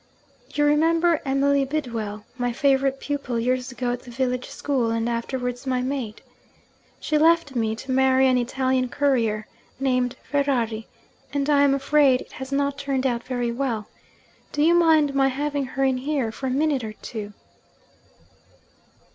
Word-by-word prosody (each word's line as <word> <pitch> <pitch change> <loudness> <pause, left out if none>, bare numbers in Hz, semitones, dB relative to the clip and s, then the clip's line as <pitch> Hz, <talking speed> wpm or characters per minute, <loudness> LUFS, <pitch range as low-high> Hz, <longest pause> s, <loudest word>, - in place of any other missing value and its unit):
'You 295 - +1
remember 325 +2 +3
Emily 275 +1 +2
Bidwell, 230 -8 -4
my 245 -1 -1
favourite 270 +1 +2
pupil 280 -5 -3
years 255 +2 -1
ago 245 0 -2
at 245 - -3
the 250 - -13
village 250 0 -2
school, 260 -5 -1
and 230 0 -1
afterwards 245 +2 -3
my 255 -1 0
maid? 255 -5 -4 0.8
She 305 - 0
left 325 -3 +3
me, 220 -2 0
to 260 +4 -7
marry 265 0 +4
an 255 - +3
Italian 255 +1 0
courier, 230 -7 +1 0.3
named 255 -2 +1
Ferrari 245 -6 -1 0.5
and 285 -1 0
I 285 -1 +5
am 280 -1 +4
afraid 275 -1 +3
it - - -13
has 265 +1 -8
not 280 0 0
turned 275 -2 -1
out 240 -2 0
very 245 -2 -2
well. 235 -4 -2 0.6
Do 295 - +1
you 335 +2 +5
mind 320 -4 +4
my 270 -1 +3
having 285 +1 -1
her 265 +1 -2
in 265 -1 +2
here 270 -4 -1
for 265 +4 -5
a - - 0
minute 280 0 +1
or 215 -1 -5
two?' 210 -1 -7
265 Hz, 160 wpm, -24 LUFS, 245-280 Hz, 0.8 s, I